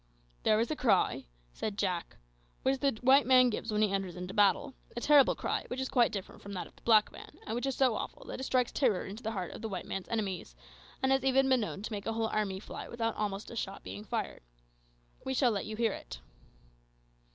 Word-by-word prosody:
"There 215 - +3
is 230 +6 0
a - - 0
cry," 205 - +2 0.3
said 210 -2 -4
Jack, 180 -5 -2 0.5
"which 265 0 +2
the 275 -5 +1
white 270 +2 +6
man 255 -1 +6
gives 220 +1 -3
when 210 0 +2
he 210 - +2
enters 195 -3 -2
into 180 +1 -6
battle 210 +7 +3 0.2
a - - +1
terrible 285 +1 +5
cry, - - -2
which 250 - -4
is 265 - -2
quite 240 -3 +3
different 195 -3 -6
from 200 - -8
that 185 - -4
of - - -17
the - - -21
black 215 -2 +5
man, - - -12
and 220 - -3
which 245 +3 -1
is 270 - -1
so 260 -3 +3
awful - - -6
that - - -6
it - - -4
strikes 255 -2 +1
terror 235 -10 +1
into 205 +4 -8
the 220 -1 -3
heart 185 -4 -4
of - - -9
the 225 - -4
white 185 -3 -4
man's 195 - -5
enemies, 195 - -3 0.5
and 265 - +3
has 270 -1 +3
even 270 0 +4
been 260 -1 +4
known 205 -1 -4
to 230 - -5
make 205 -1 -5
a 225 - 0
whole 225 0 0
army 200 -3 -1
fly - - -8
almost 215 -4 -2
without - - -9
a - - -7
shot 195 -3 -4
being 100 +3 -7
fired. - - -3 0.8
We 265 0 -2
shall 250 -2 +4
let 200 -3 -2
you 215 - -5
hear 225 -1 +1
it." - - -8
220 Hz, 240 wpm, -31 LUFS, 195-255 Hz, 0.8 s, white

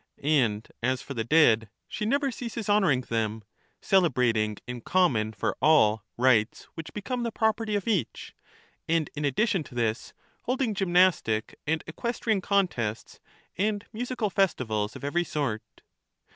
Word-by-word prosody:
And 120 -8 +1
as 130 +2 0
for 140 - -7
the 115 -3 -2
dead, 115 -5 +4 0.2
she 210 - -3
never 275 +3 +1
ceases 230 -3 -6
honouring 195 -11 +3
them, 110 -3 -2 0.4
celebrating 125 - +2
in 125 -1 -6
common 120 -11 +2
for 110 - -2
all 110 -8 +4
rites 120 -3 +2
which 165 -1 -8
become 245 +4 -4
the 235 -1 -2
property 220 -1 0
of 200 0 -2
each; 190 - -2 0.5
and 165 -2 0
in 150 0 -2
addition 190 - +1
to 125 - -13
this, 115 -1 -2 0.3
holding 255 -2 0
gymnastic 175 - +2
and 160 +1 0
equestrian 220 +3 -2
contests, 175 - -1 0.4
and 210 +1 0
musical 240 -2 -2
festivals 110 - 0
of - - -10
every 170 +5 0
sort. 140 -10 -2
155 Hz, 140 wpm, -27 LUFS, -, 0.5 s, dead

